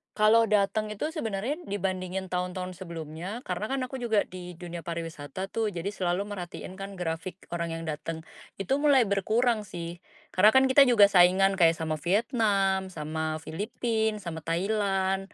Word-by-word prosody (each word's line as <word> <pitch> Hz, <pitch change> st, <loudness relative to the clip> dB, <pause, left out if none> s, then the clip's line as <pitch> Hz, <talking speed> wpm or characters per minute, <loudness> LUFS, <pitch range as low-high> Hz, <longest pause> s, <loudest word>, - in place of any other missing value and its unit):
Kalau 220 Hz, +2 st, +5 dB
dateng 210 Hz, +1 st, +1 dB
itu 300 Hz, +9 st, -3 dB
sebenarnya 245 Hz, -, -3 dB
dibandingin 190 Hz, -1 st, -3 dB
tahun-tahun 180 Hz, 0 st, -3 dB
sebelumnya 170 Hz, +5 st, -6 dB
karena 185 Hz, +1 st, -3 dB
kan 270 Hz, +2 st, -2 dB
aku 255 Hz, +1 st, -4 dB
juga 225 Hz, -4 st, +2 dB
di 180 Hz, -1 st, -8 dB
dunia 170 Hz, -1 st, -8 dB
pariwisata 165 Hz, +2 st, -5 dB
tuh, 220 Hz, -2 st, -1 dB
jadi 175 Hz, +3 st, -3 dB
selalu 185 Hz, -2 st, -1 dB
merhatiin 185 Hz, -1 st, -7 dB
kan 195 Hz, 0 st, -6 dB
grafik 170 Hz, 0 st, -4 dB, 0.2 s
orang 170 Hz, -1 st, -3 dB
yang 165 Hz, -, -5 dB
dateng, 160 Hz, +1 st, -4 dB, 0.4 s
itu 270 Hz, +9 st, +1 dB
mulai 275 Hz, -7 st, +4 dB
berkurang 215 Hz, +3 st, +1 dB
sih. 170 Hz, -2 st, -6 dB, 0.3 s
Karena 210 Hz, +4 st, +5 dB
kan 265 Hz, 0 st, +5 dB
kita 275 Hz, +1 st, +7 dB
juga 210 Hz, -5 st, +6 dB
saingan 190 Hz, +1 st, +5 dB
kayak 165 Hz, -2 st, +6 dB
sama 160 Hz, -1 st, -3 dB
Vietnam, 195 Hz, -, +1 dB
sama 155 Hz, 0 st, -3 dB
Philippines, 220 Hz, +3 st, -2 dB
sama 160 Hz, -3 st, -6 dB
Thailand. 195 Hz, +1 st, 0 dB
190 Hz, 155 wpm, -28 LUFS, 170-215 Hz, 0.4 s, kita